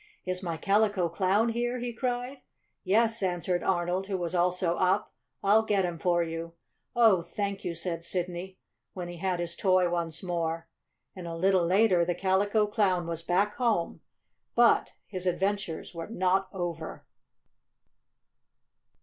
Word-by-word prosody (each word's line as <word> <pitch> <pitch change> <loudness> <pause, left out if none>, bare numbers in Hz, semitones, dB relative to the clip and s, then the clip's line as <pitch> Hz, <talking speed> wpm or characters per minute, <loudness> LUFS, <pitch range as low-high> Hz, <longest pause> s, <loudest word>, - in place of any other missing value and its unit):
"Is 185 0 -2
my 170 -4 -3
Calico 200 -1 +2
Clown 195 +6 +2
here?" 240 +2 -1
he 240 -1 -4
cried. 250 +3 -3 0.4
"Yes," 225 +3 +2
answered 180 -1 0
Arnold, 180 +1 0
who 195 -2 -1
was 175 -1 -3
also 180 0 +1
up. 190 +3 +1 0.3
"I'll 210 +3 +5
get 205 -4 +1
him 170 -2 -4
for 175 -1 +2
you." 165 0 -5 0.4
"Oh, 225 -7 +5
thank 200 +3 -4
you!" 170 -2 -3
said 170 0 -3
Sidney, 180 +1 -4 0.4
when 180 -2 -5
he 175 - -8
had 180 0 -1
his 170 0 -3
toy 185 -2 +3
once 170 -1 -3
more. 165 -2 -2 0.5
And 180 -2 -7
a 165 - -4
little 185 0 +3
later 185 -1 +4
the 175 0 -1
Calico 205 +3 +2
Clown 195 -4 +1
was 165 -1 -4
back 190 +5 +1
home. 230 -9 0 0.5
But 235 0 +4
his 185 -2 -5
adventures 190 -2 -1
were 165 -1 -6
not 190 -2 +1
over. 170 -4 -5
185 Hz, 150 wpm, -28 LUFS, 175-205 Hz, 0.5 s, I'll